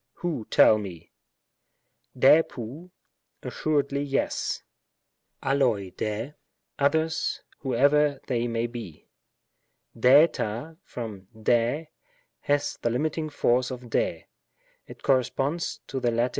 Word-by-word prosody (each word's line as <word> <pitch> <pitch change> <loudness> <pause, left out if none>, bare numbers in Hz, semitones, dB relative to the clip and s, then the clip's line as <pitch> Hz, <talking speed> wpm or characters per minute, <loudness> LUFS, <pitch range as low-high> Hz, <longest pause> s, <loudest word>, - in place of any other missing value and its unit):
who, 155 -11 -4
tell 110 - +6
me? 90 -5 -8 0.6
" - - -32
Sr^Tiovy 135 +2 +3 0.3
" - - -51
assuredly 140 -2 0
yes; 140 -1 -1 0.4
" - - -29
aXXoc 120 -9 +1
Sr^, 110 +6 -3 0.2
" - - -50
others, 160 +3 +1 0.2
whoever 145 +2 +3
they 120 -2 -1
may 115 0 -1
be." 115 -9 -8 0.9
SfJTa, 135 +2 +3
from 105 -6 -7
5;^, 120 +7 +1 0.5
has 145 0 -1
the 120 - +1
limiting 155 +5 -1
force 125 -3 +1
of 125 -1 -6
8ri; 110 -8 -1 0.6
it - - -13
corresponds 135 +5 0
to 135 - -4
the 120 - +1
Lat. 120 +2 +1
130 Hz, 115 wpm, -26 LUFS, 115-145 Hz, 0.9 s, tell